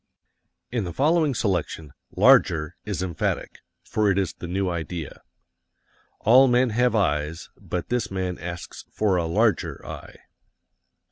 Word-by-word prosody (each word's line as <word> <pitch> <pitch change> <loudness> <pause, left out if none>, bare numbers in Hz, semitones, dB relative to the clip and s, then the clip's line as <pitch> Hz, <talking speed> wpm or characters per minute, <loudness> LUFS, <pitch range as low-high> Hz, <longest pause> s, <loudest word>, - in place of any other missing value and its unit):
In 120 -3 -1
the 85 -2 -5
following 150 - +2
selection, 85 -8 -2 0.2
"larger" 75 +1 +4
is 100 -3 -3
emphatic, 85 -3 -3 0.2
for 105 -1 0
it 100 - +1
is 95 -2 0
the 85 - -8
new 95 +2 -1
idea. 85 -2 -5 1.0
All 130 +4 +6
men 125 0 +3
have 125 +2 +2
eyes, 75 -5 -1
but 90 -2 -5
this 120 -4 -1
man 95 -2 -3
asks 85 0 -7
for 105 -3 +1
a 85 -2 0
LARGER 105 +3 0
eye. - - -9
95 Hz, 135 wpm, -24 LUFS, 85-115 Hz, 1.0 s, All